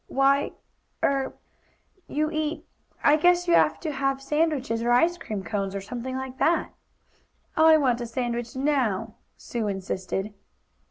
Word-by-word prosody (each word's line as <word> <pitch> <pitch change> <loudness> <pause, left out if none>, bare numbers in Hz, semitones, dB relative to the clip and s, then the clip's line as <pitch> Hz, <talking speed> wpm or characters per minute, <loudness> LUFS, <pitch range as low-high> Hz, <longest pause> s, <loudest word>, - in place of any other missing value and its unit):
"Why 275 +1 +2 0.5
er 270 -1 +1 0.7
you 305 +1 -1
eat 310 0 -2 0.4
I 295 +1 +6
guess 355 +2 +3
you 345 - +3
have - - +4
to 315 - -2
have 275 -1 0
sandwiches, 275 -5 0
or 240 +1 +1
ice 330 +9 +4
cream 210 - -5
cones, 195 0 -3
or 195 - -3
something 245 +5 -5
like 265 0 -6
that." 335 - +2 0.8
"I 315 0 +7
want 250 -5 +1
a 240 - -3
sandwich 240 0 -3
now!" 260 -8 0 0.2
Sue 230 -3 -3
insisted. 195 +1 -3
265 Hz, 145 wpm, -26 LUFS, 230-300 Hz, 0.8 s, I